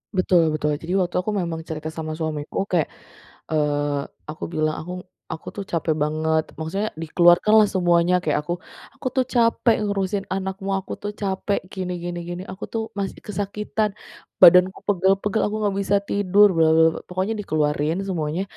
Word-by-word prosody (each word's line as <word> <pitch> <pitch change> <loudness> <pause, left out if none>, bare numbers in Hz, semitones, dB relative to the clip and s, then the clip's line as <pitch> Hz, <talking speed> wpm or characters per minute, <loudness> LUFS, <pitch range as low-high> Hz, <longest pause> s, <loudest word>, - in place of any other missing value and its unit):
Betul 185 -1 +4
betul. 150 0 0
Jadi 170 +3 -4
waktu 185 -3 0
aku 185 +4 -2
memang 170 -4 -2
cerita 155 0 -5
sama 155 -1 -5
suamiku, 155 +1 -3
kayak, 170 -5 +2 0.6
eee, 145 -2 0 0.3
aku 155 - -11
bilang, 155 -2 0
"Aku 180 +3 -7 0.3
aku 160 - -7
tuh 200 - -5
capek 165 -1 0
banget," 155 +1 +1 0.2
maksudnya 195 +7 -2
dikeluarkanlah 175 +6 +5
semuanya, 175 -1 +3
kayak 155 -4 +1
aku, 170 +4 -2 0.4
"Aku 270 - -8
tuh 260 -1 +2
capek 230 -1 +3
ngurusin 195 0 -1
anakmu, 190 +1 -4
aku 190 - -7
tuh 205 - -2
capek 200 +1 0
gini 185 -2 -4
gini 175 0 -4
gini, 175 +1 -5
aku 190 - -7
tuh 225 - -1 0.2
masih 195 -1 -3
kesakitan, 210 +1 -2 0.5
badanku 180 +2 +8
pegal-pegal, 195 +2 +2
aku 210 +1 -2
enggak 205 -2 +1
bisa 200 +1 +2
tidur 205 +1 +4
bla 165 -1 +4
bla 160 0 +6
bla," - - -6
pokoknya 185 +4 -1
dikeluarin 150 -2 0
semuanya 165 -2 -2
180 Hz, 160 wpm, -23 LUFS, 160-200 Hz, 0.6 s, badanku